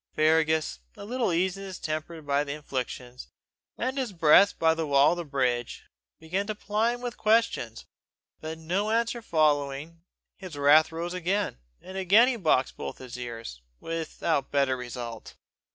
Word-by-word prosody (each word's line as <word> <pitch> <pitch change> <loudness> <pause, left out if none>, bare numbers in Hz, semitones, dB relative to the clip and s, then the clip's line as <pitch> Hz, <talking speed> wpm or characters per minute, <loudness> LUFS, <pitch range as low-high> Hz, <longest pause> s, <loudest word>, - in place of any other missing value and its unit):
Fergus, 155 - +2 0.2
a - - -8
little 245 -2 -1
eased 180 +3 +1
in 195 - -8
his 190 -2 -7
temper 155 +2 -4
by 145 0 +1
the 140 -1 -4
infliction, 125 -4 -5 0.6
and - - -1
in 270 - -12
his 255 -6 -2
breath 165 +4 +5
by 160 0 +4
the 160 -1 -3
wall 140 0 +5
of 175 - -1
the 175 - -3
bridge, 125 -5 -1 0.4
began 185 +5 -2
to 215 - -3
ply 215 +3 0
him 245 - -11
with 245 -1 -5
questions; 215 - +1 0.5
but 160 +1 -6
no 180 +6 -1
answer 235 +1 0
following, 155 -2 0 0.4
his 185 -6 -9
wrath 150 +3 +5
rose 170 +2 -4
again, 180 - -1 0.2
and 190 +1 -7
again 200 +6 +6
he 260 - +1
boxed 155 - +1
both - - -6
his 125 -2 -9
ears 115 - -7 0.2
without 165 -3 -2
better 140 -2 +2
result. 120 -2 -7
160 Hz, 170 wpm, -27 LUFS, 140-195 Hz, 0.6 s, again